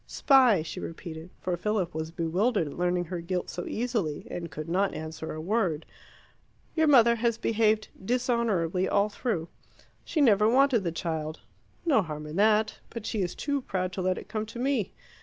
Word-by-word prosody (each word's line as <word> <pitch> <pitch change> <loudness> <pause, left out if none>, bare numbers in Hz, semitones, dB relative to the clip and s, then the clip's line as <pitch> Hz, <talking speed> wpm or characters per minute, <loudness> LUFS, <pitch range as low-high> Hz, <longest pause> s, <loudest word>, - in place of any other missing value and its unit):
"Spy," 255 - +4
she 160 - -6
repeated, 165 0 -7
for 180 - -1
Philip 190 -1 -1
was 160 0 -3
bewildered 175 +5 +1
at 145 - -6
learning 175 0 0
her 175 0 -5
guilt 180 +1 -3
so 175 - -5
easily, 220 -11 -2
and 170 -1 -5
could 150 +2 -6
not 190 +4 +1
answer 160 0 -6
a 155 - -5
word. 175 -3 0 0.9
"Your 320 -1 +3
mother 235 -5 +6
has 230 0 +1
behaved 220 -1 +1
dishonourably 225 -7 +1
all 205 +1 +2
through. 205 -6 -2 0.6
She 320 - -2
never 215 -6 +5
wanted 260 -3 +4
the 170 - -1
child; 160 -1 -4 0.4
no 280 -10 +4
harm 150 -4 -6
in 150 +1 -7
that; 215 +1 +3
but 230 -2 -7
she 215 - -1
is 180 -1 -2
too 285 -1 -1
proud 185 -5 -2
to 190 - -3
let 185 0 +1
it - - -8
come 215 0 -3
to 230 - -9
me. 255 -5 0
195 Hz, 180 wpm, -28 LUFS, 170-230 Hz, 0.9 s, mother